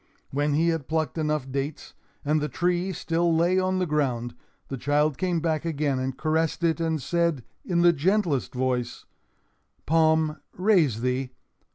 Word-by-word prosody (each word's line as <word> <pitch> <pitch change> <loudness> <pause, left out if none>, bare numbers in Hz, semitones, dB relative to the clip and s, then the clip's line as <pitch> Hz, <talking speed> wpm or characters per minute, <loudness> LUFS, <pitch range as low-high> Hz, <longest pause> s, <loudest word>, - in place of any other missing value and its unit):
When 145 +1 0
he 165 +3 +3
had 165 -5 -2
plucked 160 -1 -1
enough 150 -4 -1
dates, 140 +2 -4 0.3
and 150 +1 +2
the 150 - -2
tree 175 +6 0
still 165 -1 0
lay 175 +3 +3
on 185 0 0
the 185 - +1
ground, 130 -6 -1 0.3
the 135 - -4
child 145 +2 +1
came 180 +1 0
back 160 -2 0
again 145 -5 -1
and 130 0 -3
caressed 160 +2 0
it 165 0 +2
and 160 -1 0
said, 170 -2 0 0.2
in 170 -2 0
the 175 0 +6
gentlest 165 - 0
voice: 125 -1 -2 0.8
"Palm, 160 -1 +2 0.2
raise 175 - +3
thee! 125 +1 -1
155 Hz, 160 wpm, -26 LUFS, 140-170 Hz, 0.8 s, the